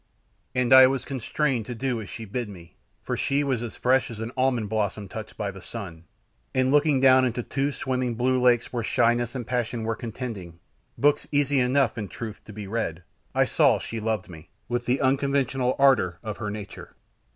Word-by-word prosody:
And 125 0 +3
I 130 0 +10
was 135 0 -2
constrained 135 -2 -1
to 125 - -5
do 125 -1 -2
as 100 - -9
she 115 +5 -7
bid 115 +2 -4
me, 85 -4 -13 0.3
for - - -2
she 140 +1 0
was 130 -5 0
as 120 -2 -6
fresh 130 +1 +2
as 115 -2 -8
an 115 +1 -4
almond 130 -4 +1
blossom 105 -1 -2
touched 110 +2 -8
by 100 -1 -2
the 95 -1 -11
sun, 90 -8 -8 0.5
and 130 0 +2
looking 145 -1 +4
down 130 0 +6
into 120 -1 -1
two 140 +4 -1
swimming 130 -3 -2
blue 130 +2 +1
lakes 120 -1 +3
where 120 - -1
shyness 120 +2 +1
and 125 -3 -4
passion 120 -1 -2
were 115 0 -1
contending 110 -7 -6 0.4
books 145 +1 +2
easy 145 -1 +2
enough, 125 -2 +2
in 105 - -4
truth, 110 +1 -7
to - - -10
be 105 0 -7
read, 95 -5 -3 0.3
I - - +4
saw - - +4
that - - -3
she 115 - -5
loved 110 -2 -2
me, 85 -2 -12 0.2
with 120 0 -2
the 125 +2 +1
unconventional 135 -1 +1
ardour 125 -11 +4
of 110 -2 -5
her 105 -2 -4
nature. 105 -1 -8
120 Hz, 200 wpm, -25 LUFS, 110-130 Hz, 0.5 s, I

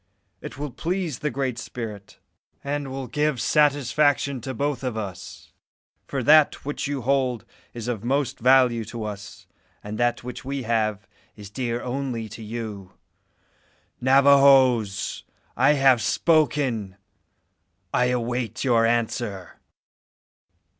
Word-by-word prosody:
It - - -8
will 145 -1 -5
please 170 +1 -3
the 150 - -1
Great 130 -2 -3
Spirit, 105 -6 -8 0.5
and 140 0 -3
will 135 0 -5
give 150 -1 -1
satisfaction 145 -1 +2
to 130 - -5
both 140 +1 -2
of 125 -3 -3
us; 100 -4 -8 0.5
for 135 -3 -3
that 150 +2 +4
which 145 0 -3
you 140 -3 -3
hold 130 -3 0 0.3
is 115 -1 -6
of 115 -4 -3
most 135 +1 -1
value 125 -2 +4
to 115 +1 -6
us, 100 -2 -8 0.4
and 105 +1 -6
that 120 0 0
which 125 +1 -7
we 135 0 -4
have 110 -3 -1 0.3
is 105 -2 -11
dear 120 +1 -3
only 125 -3 -3
to 110 - -10
you. 105 -4 -7 1.1
Navajoes! 130 -5 +4 0.3
I 150 - +4
have 135 -4 +4
spoken. 135 - +1 1.0
I 125 - +3
await 125 -1 -2
your 115 -3 +3
answer." 115 -5 -2
125 Hz, 125 wpm, -24 LUFS, 115-140 Hz, 1.1 s, that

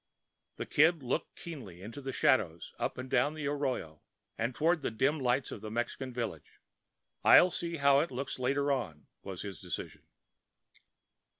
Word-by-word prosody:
The - - -4
Kid 160 0 +4
looked 125 - -2
keenly 110 - -9
into 115 +7 -8
the 135 0 -4
shadows 90 -11 +1
up - - -2
and 130 0 -5
down 135 +4 +2
the 155 -2 -4
arroyo 135 - -2 0.3
and 120 +2 -2
toward 165 +1 +2
the - - -1
dim 135 +7 +1
lights 130 0 +1
of - - -7
the 110 - -6
Mexican 120 +3 -3
village. 120 -2 -5 0.6
"I'll 180 - +8
see 170 0 -3
how 140 -1 +5
it 160 - 0
looks 130 +1 -4
later 140 +3 +1
on," 95 - -3 0.2
was 95 -2 -6
his 100 -5 -7
decision. - - -6
130 Hz, 165 wpm, -32 LUFS, 115-145 Hz, 0.6 s, I'll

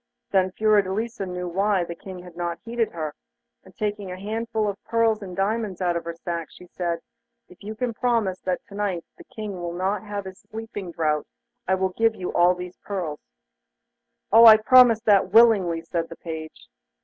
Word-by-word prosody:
Then 190 -1 +3
Fiordelisa 215 +1 +1
knew 180 0 -4
why 195 +1 +1
the 170 - -6
King 180 +1 -10
had 180 -1 -13
not 175 -1 -3
heeded 230 -1 -1
her, 155 -3 -5 0.5
and 190 - -19
taking 205 -2 -3
a 180 - -7
handful 220 +1 -2
of 200 -1 -5
pearls 225 -2 +1
and 185 -3 -7
diamonds 205 0 -1
out 175 -2 0
of 170 - -3
her 170 0 -5
sack, 170 -1 -4
she 180 - -14
said, 170 -1 -3 0.5
'If 180 - -18
you 215 +2 -6
can 240 +1 -2
promise 220 -5 0
me - - -49
that 180 -1 -2
to - - -12
night 200 -4 -2
the - - -11
King 215 -2 -6
shall 175 -2 -5
not 190 +4 -1
have 205 -2 -5
his 190 0 -9
sleeping 220 -5 -7
draught, 155 -2 0 0.4
I 190 - +3
will 190 0 0
give 225 +4 +1
you 180 - -5
all 175 +1 +4
these 180 0 -8
jewels.' 175 -7 -4 1.1
'Oh! 230 +2 +9
I 220 -1 +11
promise 235 0 +6
that 205 -4 +4
willingly,' 200 -7 +5
said 165 0 -3
the 165 - -8
page. 160 -1 -8
190 Hz, 195 wpm, -24 LUFS, 175-215 Hz, 1.1 s, I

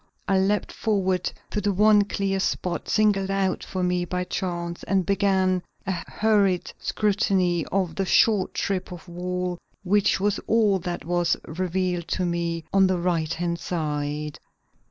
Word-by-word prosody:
I 195 -1 +3
leaped 200 +2 +1
forward 190 -4 0 0.2
to 210 - -1
the 205 +1 +1
one 210 +1 +5
clear 195 -1 -1
spot 180 -2 -2
singled 205 -3 +2
out 195 -1 0
for 185 -1 -3
me 180 0 +1
by 180 +1 -2
chance 175 -2 -4
and 190 -2 +1
began 190 -2 +2 0.2
a 190 - -1 0.2
hurried 200 -4 +1
scrutiny 190 -5 +1
of 185 -3 0
the 195 +3 -1
short 205 -2 +3
strip 190 -2 -1
of 180 0 -9
wall 180 0 -3 0.2
which 200 +1 +2
was 205 +1 +1
all 215 -4 +3
that 175 -4 -5
was 175 0 +1
revealed 180 +1 -2
to 185 - -1
me 170 -1 -2
on 195 -1 +5
the 185 -1 +1
right 170 -3 0
hand 170 0 -2
side. 150 -2 -3
185 Hz, 155 wpm, -25 LUFS, 175-195 Hz, 0.2 s, one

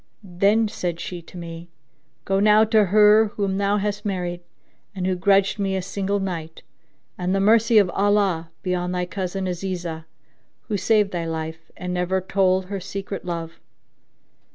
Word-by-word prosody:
Then 200 +4 +2
said 175 -5 -4
she 175 -1 -6
to 170 - -13
me, 170 0 -8 0.6
"Go 195 0 +1
now 210 +1 +6
to 220 -1 +4
her 210 +3 +5
whom 195 -2 -1
thou 200 +1 +2
hast 205 0 -2
married 180 -3 -3 0.5
and 185 -2 -3
who 185 - +1
grudged 195 +3 +2
me 195 -1 0
a 190 - -2
single 200 +1 -2
night, 165 -4 -5 0.6
and 180 +1 0
the - - +1
mercy 225 +3 +4
of 195 -4 +5
Allah 195 -5 +1
be 185 - -1
on 180 0 -2
thy 180 0 -1
cousin 190 +1 -4
Azizah, 175 -3 -4 0.6
who 215 - -4
saved 205 +1 +2
thy 170 -2 -3
life 160 0 -5
and 180 0 -4
never 180 +1 0
told 190 0 +1
her 195 +1 -4
secret 195 +1 -6
love! 165 -2 -5
190 Hz, 165 wpm, -23 LUFS, 175-200 Hz, 0.6 s, now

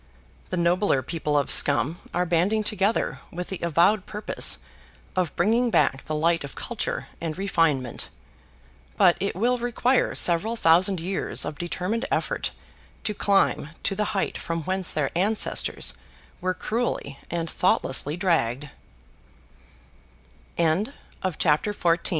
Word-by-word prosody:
The 185 - -2
nobler 170 -4 +2
people 150 +1 -1
of 140 - +2
Scum 145 +9 +4
are 180 +1 0
banding 180 +6 +1
together 210 +1 0
with 180 +1 -5
the 190 - -4
avowed 175 +5 +2
purpose 210 0 +1 0.6
of 180 -3 -1
bringing 230 +7 +2
back 135 - +1
the 155 - -3
light 165 +1 +1
of 140 - -8
culture - - -3 0.2
and 165 -1 -3
refinement. 165 - 0 0.9
But 175 - +5
it 200 - -2
will 240 +6 +1
require 245 +2 +1
several 185 +7 +3
thousand 180 0 +3
years 185 +4 0
of 150 0 -6
determined 185 +7 -2
effort - - -1 0.5
to 210 - -1
climb 195 -7 +2
to - - 0
the 210 +2 -1
height - - -1
from 165 -1 -3
whence 185 +1 0
their 150 -1 -1
ancestors 205 +5 +1 0.5
were 185 0 -1
cr 225 +5 -2
180 Hz, 115 wpm, -25 LUFS, 165-210 Hz, 0.9 s, But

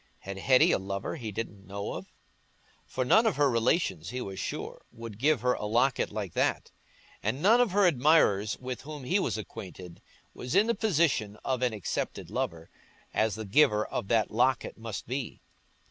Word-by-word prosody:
Had 95 0 -7
Hetty 130 +5 +5
a - - +2
lover 100 0 -4
he 115 -6 -5
didn't 105 -2 -6
know 100 +1 -4
of? - - -7 0.8
For 130 - -2
none 220 - +5
of 215 - +1
her 145 0 +3
relations, 115 - +1
he 125 - -4
was 95 -5 -6
sure, - - -5
would 115 -2 -9
give 145 -1 +3
her 125 0 +2
a 105 - -4
locket 120 +4 +1
like 105 -4 -4
that; - - 0 0.5
and 130 - -1
none 225 +9 +5
of 245 - +3
her 200 +1 +3
admirers, 130 - +3
with 130 0 -6
whom 150 -1 -8
he 185 +11 +1
was 190 - -1
acquainted, 90 -4 -9 0.3
was 125 +6 -5
in 200 +2 +6
the 235 - +1
position 155 - +1
of 130 -2 -1
an 125 -1 +2
accepted 105 -5 -4
lover, 80 0 -3 0.4
as 110 -1 +1
the 110 -1 -6
giver 105 -1 +4
of 110 - -4
that 110 -1 +2
locket 125 +2 +1
must 110 -2 -6
be. 130 0 -4
120 Hz, 185 wpm, -29 LUFS, 105-145 Hz, 0.8 s, in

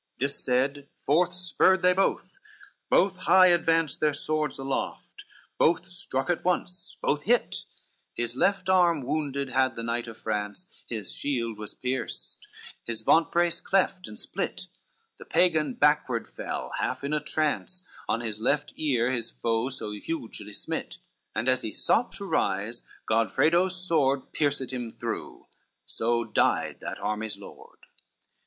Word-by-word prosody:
CXXXIX - - -54
This 140 +2 -1
said, 135 +3 +1 0.2
forth 175 +5 +3
spurred 185 +1 +3
they 180 0 +6
both, 195 - 0 0.5
both 190 -1 +4
high 185 0 +6
advance 165 -3 +2
Their 150 -2 +2
swords 155 0 -1
aloft, 135 - -4 0.3
both 170 +2 +3
struck 175 -5 -1
at 175 - -2
once, 180 0 -1
both 145 0 +1
hit, 240 +4 +1 0.5
His 120 0 -1
left 195 +9 +1
arm 175 -5 +4
wounded 140 -1 -2
had 130 0 +2
the 115 - -4
knight 115 +1 -2
of 115 -1 -9
France, 105 - -3 0.2
His 110 -4 -3
shield 115 -6 -2
was 105 -1 -6
pierced, 130 +1 -4 0.4
his 115 -2 -4
vantbrace 170 +4 +3
cleft 190 -1 +1
and 105 - -9
split, - - -3 0.5
The - - -10
Pagan 155 -7 +2
backward 145 -5 +2
fell, - - -5
half - - -2
in 140 +2 -2
a 150 - +2
trance, 155 +4 -1 0.2
On 115 - +1
his 110 -2 -2
left 145 +5 +1
ear 130 -5 +2
his 120 -2 -1
foe 115 +2 -1
so 125 -5 -5
hugely 105 -3 -5
smit, - - -4 0.4
And 115 +3 -1
as 130 -1 +3
he 110 - -4
sought 240 - +2
to 200 - -6
rise, 105 - 0 0.3
Godfredo's 160 - +3
sword 150 -7 +1
Pierced 140 -4 0
him 120 -3 -4
through, - - -5 0.4
so 115 +1 0
died 110 -2 +1
that - - -5
army's 105 0 -3
lord. - - -14
140 Hz, 150 wpm, -27 LUFS, 115-170 Hz, 0.5 s, they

